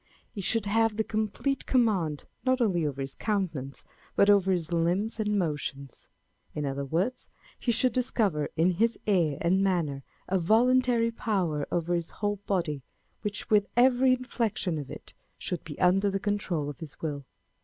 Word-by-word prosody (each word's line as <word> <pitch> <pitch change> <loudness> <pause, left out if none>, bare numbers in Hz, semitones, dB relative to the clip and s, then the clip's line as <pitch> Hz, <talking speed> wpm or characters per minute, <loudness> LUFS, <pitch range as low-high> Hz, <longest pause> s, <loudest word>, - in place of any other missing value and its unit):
He 205 - -5
should 210 +3 0
have 225 +1 +2
the 220 - +2
complete 220 +6 -2
command, 195 - +1 0.2
not 255 0 +2
only 180 -9 +2
over 140 -1 -4
his 135 0 -4
countenance, 165 - -3 0.3
but 200 +1 +6
over 195 -2 +4
his 175 -2 -1
limbs 180 +7 0
and 210 -1 +1
motions. 145 -6 -3 0.5
In 150 - -2
other 140 0 -2
words, 180 - -2 0.3
he 240 - +1
should 245 +1 +2
discover 210 - +1
in 170 +3 +4
his 225 +6 +1
air 170 -9 +2
and 185 +3 +3
manner 170 -8 0 0.3
a 190 0 +1
voluntary 235 +4 +3
power 180 -10 -1
over 175 0 0
his 170 -1 -1
whole 205 0 -2
body, 165 -7 -1 0.4
which 210 +1 -4
with 205 -1 +4
every 255 +1 +5
inflection 230 - -1
of 140 -3 -7
it, - - -10 0.2
should 180 - -4
be 150 - -9
under 190 +3 +4
the 195 0 -1
control 195 -7 -1
of 145 - -7
his 160 -4 -9
will. 145 -3 -4
190 Hz, 165 wpm, -28 LUFS, 160-220 Hz, 0.5 s, but